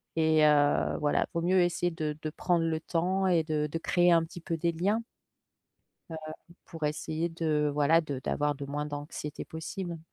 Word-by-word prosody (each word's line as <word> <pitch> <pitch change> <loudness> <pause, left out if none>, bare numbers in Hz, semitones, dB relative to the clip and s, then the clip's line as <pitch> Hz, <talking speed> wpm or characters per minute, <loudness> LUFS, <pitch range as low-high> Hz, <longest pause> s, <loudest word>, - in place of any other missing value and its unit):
et 160 -1 +4
heu, 145 -1 +3
voilà 145 -1 +1
vaut 170 - -1
mieux 180 +2 +3
essayer 175 0 +1
de 155 -2 -3
de 155 - -3
prendre 170 +1 +1
le 160 -1 0
temps 185 +4 0
et 170 -3 +3
de 155 -1 -1
de 150 - -3
créer 175 +1 +3
un 165 -1 +4
petit 165 +2 -9
peu 165 - -2
des 170 +1 +1
liens. 200 +7 0 1.1
Heu, 160 - -5 0.5
pour 165 -3 -7
essayer 155 +2 -2
de, 155 -3 0
voilà, 150 +3 +4
de 145 -5 -5
d'avoir 145 +2 0
de 140 0 -7
moins 145 +1 -3
d'anxiété 145 0 -6
possible. 170 +2 -6
160 Hz, 185 wpm, -29 LUFS, 150-170 Hz, 1.1 s, et